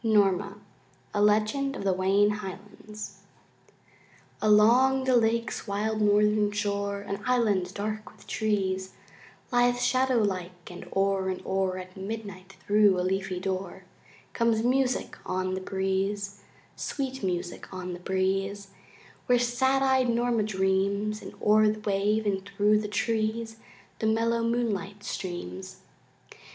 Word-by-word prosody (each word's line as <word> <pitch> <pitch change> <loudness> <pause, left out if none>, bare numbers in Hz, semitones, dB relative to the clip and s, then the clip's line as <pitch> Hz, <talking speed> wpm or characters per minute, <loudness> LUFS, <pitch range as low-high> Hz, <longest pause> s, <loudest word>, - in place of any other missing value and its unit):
Norma 200 -3 +2 0.6
A 205 - +1
Legend 215 +7 +2
of - - -5
the 195 -1 +2
Wayne 195 +3 +3
Highlands 210 +1 -8 1.2
Along 240 +6 +5
the 260 -1 +3
lake's 230 0 +1
wild 215 +2 -1
northern 210 0 +3
shore 200 -1 -2
An 200 0 -5
island 210 -8 +1
dark 215 +1 -4
with - - -18
trees 190 -3 -1 0.6
Lies 245 0 +3
shadow 255 +1 +2
like, 185 -5 -2
and 175 - -9
o'er 195 -1 +1
and 185 - -3
o'er 190 -1 0
At 185 0 -9
midnight 195 -2 -7
thru 205 -2 +4
a - - +1
leafy 190 0 -1
door 190 0 -4 0.5
Comes 230 -1 +2
music 255 +1 +1
on 185 0 -2
the 190 - -3
breeze, 195 +1 -2 0.3
Sweet 265 -1 -4
music 180 -2 -3
on 185 -1 -5
the 175 - -7
breeze, 195 +2 -1 0.6
Where 250 - +5
sad 260 +3 +2
eyed 265 -2 +3
Norma 235 -1 +1
dreams, 200 +1 0
And - - -10
o'er 215 +1 +5
the 215 0 -2
wave, 210 +1 0
in 195 -2 0
thru 205 +2 +2
the 210 - -3
trees 225 +1 -1 0.4
The 220 - 0
mellow 230 +1 +2
moonlight 210 -4 -1
streams. 95 - -6
205 Hz, 130 wpm, -27 LUFS, 190-225 Hz, 1.2 s, Along